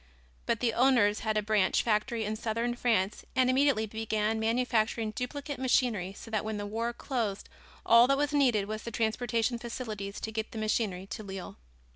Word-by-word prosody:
But 230 Hz, -, 0 dB
the 235 Hz, -2 st, +1 dB
owners 235 Hz, -5 st, +4 dB
had 215 Hz, -1 st, -1 dB
a 210 Hz, -, +1 dB
branch 210 Hz, -3 st, +2 dB
factory 220 Hz, 0 st, 0 dB
in 215 Hz, +1 st, -2 dB
southern 230 Hz, +2 st, -1 dB
France 220 Hz, -5 st, 0 dB
and 255 Hz, -1 st, +4 dB
immediately 265 Hz, -4 st, +3 dB
began 220 Hz, 0 st, -1 dB
manufacturing 225 Hz, -1 st, +1 dB
duplicate 280 Hz, +4 st, -5 dB
machinery 240 Hz, -7 st, +1 dB
so 225 Hz, -, -11 dB
that 215 Hz, -2 st, 0 dB
when 215 Hz, -1 st, -3 dB
the 205 Hz, -, -4 dB
war 225 Hz, +3 st, -2 dB
closed 230 Hz, -5 st, -3 dB, 0.4 s
all 235 Hz, +1 st, +7 dB
that 275 Hz, +1 st, +3 dB
was 290 Hz, +1 st, 0 dB
needed 245 Hz, -8 st, +3 dB
was 215 Hz, 0 st, -4 dB
the -, -, -6 dB
transportation 230 Hz, +1 st, 0 dB
facilities 215 Hz, -4 st, -5 dB
to 220 Hz, -, -4 dB
get 220 Hz, 0 st, -4 dB
the -, -, -6 dB
machinery 215 Hz, -4 st, -1 dB
to 200 Hz, -, -6 dB
Lille. 195 Hz, -3 st, -7 dB
225 Hz, 180 wpm, -30 LUFS, 215-245 Hz, 0.4 s, all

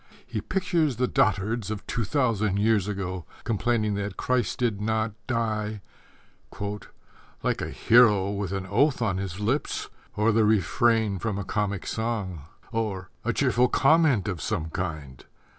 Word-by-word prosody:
He -, -, -4 dB
pictures 170 Hz, -7 st, 0 dB
the 125 Hz, +3 st, +1 dB
dotards 105 Hz, +2 st, +1 dB
of 110 Hz, -2 st, -5 dB
two 120 Hz, -, -2 dB
thousand 110 Hz, -5 st, +1 dB
years 105 Hz, -2 st, +2 dB
ago 95 Hz, -3 st, -4 dB, 0.2 s
complaining 110 Hz, -1 st, 0 dB
that 100 Hz, -1 st, -3 dB
Christ 125 Hz, -4 st, 0 dB
did 115 Hz, -5 st, 0 dB
not 110 Hz, +1 st, 0 dB, 0.2 s
die 110 Hz, -4 st, -1 dB, 1.6 s
Like -, -, 0 dB
a -, -, -3 dB
hero 105 Hz, -5 st, +4 dB
With 100 Hz, -2 st, -3 dB
an 95 Hz, -1 st, -3 dB
oath 125 Hz, +6 st, +2 dB
on 100 Hz, -4 st, 0 dB
his 95 Hz, -1 st, -4 dB
lips, 120 Hz, +8 st, -1 dB, 0.2 s
Or 105 Hz, +2 st, +3 dB
the 110 Hz, 0 st, +3 dB
refrain 110 Hz, 0 st, +2 dB
from 105 Hz, -2 st, -2 dB
a 100 Hz, -, -3 dB
comic 100 Hz, -2 st, -2 dB
song 105 Hz, -9 st, -3 dB, 0.3 s
Or 105 Hz, -6 st, -3 dB
a -, -, +1 dB
cheerful 125 Hz, +1 st, +3 dB
comment 140 Hz, -, +3 dB
of 90 Hz, -6 st, -3 dB
some 80 Hz, 0 st, -2 dB
kind. 70 Hz, -7 st, -5 dB
105 Hz, 145 wpm, -26 LUFS, 95-115 Hz, 1.6 s, hero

